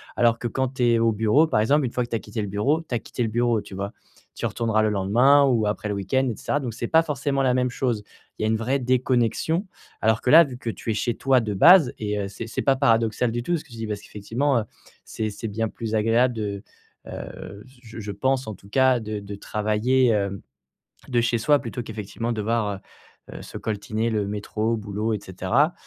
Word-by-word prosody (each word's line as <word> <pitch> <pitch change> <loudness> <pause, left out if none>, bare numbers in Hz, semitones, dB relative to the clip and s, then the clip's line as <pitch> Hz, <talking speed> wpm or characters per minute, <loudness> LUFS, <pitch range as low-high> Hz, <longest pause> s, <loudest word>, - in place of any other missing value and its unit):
Alors 115 -1 +3
que 120 - -2
quand 130 +2 -2
tu 125 - -1
es 115 -1 +3
au 115 0 +3
bureau 110 +9 +3
par 110 - +1
exemple, 140 +7 +3
une 120 - -3
fois 125 - -1
que - - -16
tu 115 - -2
as - - -1
quitté 110 +1 -5
le 105 - -3
bureau, 130 +12 0
tu 145 -7 -4
as 115 - 0
quitté - - -6
le 115 - -1
bureau, 120 -1 +1
tu 95 - -11
vois? 100 +1 -4 0.4
Tu - - -4
retourneras 110 -2 0
le 110 - +2
lendemain 120 +9 +4
ou 115 -6 +2
après 105 0 -2
le 105 - -1
week-end 130 +7 0
et - - -5
cetera. 145 - -1
Donc 120 -3 -4
c'est 120 - -4
pas 160 0 +4
forcément 140 -2 -1
la 125 - +3
même 125 0 +1
chose. 125 -3 -1 0.4
Il - - -2
y - - +2
a - - +2
une 110 - +2
vraie 125 +5 0
déconnexion. 130 - +1 0.3
Alors 110 0 +2
que - - -1
là 165 +5 +9
vu 130 -3 -8
que 120 - -5
tu 115 - -6
es - - 0
chez 120 +2 -1
toi 135 -2 +3
de 105 -2 -3
base 160 - +7
et 105 -1 -2
heu, 100 - -2
c'est 110 +3 -7
c'est - - -3
pas 135 - +3
paradoxal 115 -2 +2
du 120 0 -2
tout, 175 +4 0
ce 150 - -9
que 145 - -20
tu - - -10
dis, 110 -1 -4
parce 105 -1 -3
qu'effectivement, 120 +7 -1
heu, - - -2 0.4
c'est 110 -1 -4
c'est 115 - -6
bien 110 +2 -1
plus 110 0 -4
agréable 115 +3 +3
de, 100 -3 -4 0.4
heu, 100 +1 -8
j 130 0 -20
je 115 -1 -10
je 105 -1 -5
pense 130 +4 0
en 110 - -5
tout 100 - -18
cas 130 +1 +3
de 110 -1 -4
de 100 0 -8
travailler, 110 +6 +1
hem, 100 -3 0 0.7
de 120 -2 +2
chez 120 0 +1
soi 145 +5 +3
plutôt 120 +1 -5
qu'effectivement 110 +2 -4
devoir, 105 -2 -1 0.5
heu - - -10
heu, - - -10
se - - -8
coltiner 110 +2 -2
le 105 -2 0
métro, 105 +2 -2
boulot, 105 +1 -3
et 105 - -4
cetera. 95 - +1
115 Hz, 245 wpm, -24 LUFS, 105-130 Hz, 0.7 s, là